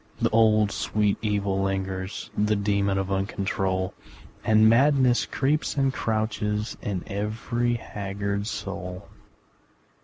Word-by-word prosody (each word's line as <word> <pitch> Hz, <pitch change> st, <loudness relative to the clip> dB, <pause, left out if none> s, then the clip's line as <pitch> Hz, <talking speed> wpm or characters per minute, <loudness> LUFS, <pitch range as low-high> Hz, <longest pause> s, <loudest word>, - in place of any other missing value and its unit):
The -, -, +1 dB
old, 110 Hz, -2 st, +4 dB
sweet 105 Hz, -1 st, 0 dB
evil 100 Hz, -2 st, 0 dB
lingers, 95 Hz, 0 st, -3 dB
The 105 Hz, +1 st, +2 dB
demon 100 Hz, -1 st, +1 dB
of 95 Hz, 0 st, -2 dB
uncontrol, 95 Hz, -1 st, -1 dB, 0.5 s
And 110 Hz, 0 st, +5 dB
madness 130 Hz, +1 st, +4 dB
creeps 145 Hz, +3 st, 0 dB
and 135 Hz, -1 st, +2 dB
crouches 110 Hz, -3 st, -1 dB
In 95 Hz, -4 st, -3 dB
every 115 Hz, +4 st, -1 dB
haggard 100 Hz, -2 st, -3 dB
soul. 95 Hz, -2 st, -5 dB
105 Hz, 110 wpm, -26 LUFS, 95-110 Hz, 0.5 s, And